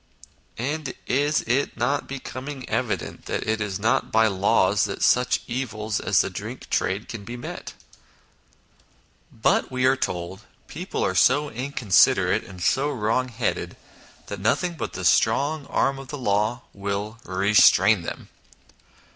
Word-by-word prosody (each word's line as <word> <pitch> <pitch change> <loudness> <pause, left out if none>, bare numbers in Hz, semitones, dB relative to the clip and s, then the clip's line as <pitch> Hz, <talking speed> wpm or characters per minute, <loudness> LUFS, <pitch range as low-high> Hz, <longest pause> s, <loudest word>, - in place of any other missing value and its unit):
And 145 +5 -3
is 145 +3 +1
it 125 +3 0
not 125 +5 0
becoming 135 0 -7
evident - - -3
that - - -3
it 110 0 0
is 100 -3 -2
not 110 +3 +1
by 110 0 +4
laws 100 0 +2
that 100 - -4
such 125 +1 +3
evils 110 -4 -3
as - - +3
the - - -2
drink - - -7
trade 95 +3 0
can 110 -4 -7
be 120 +4 -7
met? 120 - -8 1.6
But, 110 - +1
we 130 0 0
are 130 +1 +5
told, 90 -6 -3 0.3
people - - -3
are 95 - 0
so 140 - +3
inconsiderate 125 - +2
and 90 -2 -9
so 140 +9 +2
wrong 130 -1 0
headed 115 -1 -3 0.5
that 100 - -6
nothing 175 - +1
but 165 - -5
the 95 0 -5
strong 140 - +2
arm 135 0 0
of 135 - -9
the 145 - -6
law 110 +1 0
will 100 +3 -4
restrain 100 +3 +4
them. - - -7
115 Hz, 145 wpm, -24 LUFS, 100-135 Hz, 1.6 s, are